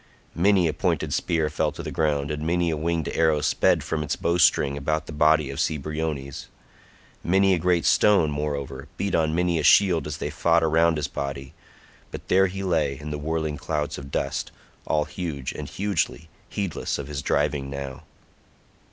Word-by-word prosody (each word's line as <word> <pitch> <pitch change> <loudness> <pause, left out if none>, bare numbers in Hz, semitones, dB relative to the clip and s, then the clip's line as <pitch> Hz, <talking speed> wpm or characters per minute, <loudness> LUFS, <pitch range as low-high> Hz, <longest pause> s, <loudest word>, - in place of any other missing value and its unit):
Many 95 0 +3
a 80 - -1
pointed - - -1
spear 80 -2 0
fell 75 - -1
to - - -6
ground 75 -2 0
and 75 0 -3
many 85 +1 +1
a - - 0
winged 80 +1 -1
arrow 80 -2 +2
sped - - +2
from 75 - -2
its 75 - -2
bowstring 85 -5 +2
about 80 +2 -1
the - - -8
body 75 -1 +3
of 70 - -6
Cebriones; 75 -2 -3 0.8
many 95 +2 +3
a 90 - +1
great 85 0 +1
stone, 95 -8 +4
moreover, 70 -1 -4
beat 100 0 -2
on 80 -1 +1
many 90 -1 +1
a - - -2
shield 90 -6 +5
as 75 -1 -4
they - - -4
fought 85 -1 +2
around 80 +1 +3
his 75 - -1
body, 70 +1 -5 0.6
but - - -9
there 95 +1 +5
he 95 +1 -5
lay 75 -7 0
in 75 0 -6
the 75 - -4
whirling 80 0 -2
clouds 75 0 -3
of 70 -1 -9
dust, - - -2 0.4
all 75 -1 +1
huge 75 -5 -5
and 75 -2 -7
hugely, 90 -3 -2 0.2
heedless 100 -5 -3
of 70 - -5
his 70 -2 -4
driving 70 -1 0
now. 70 0 -6
80 Hz, 180 wpm, -25 LUFS, 75-85 Hz, 0.8 s, shield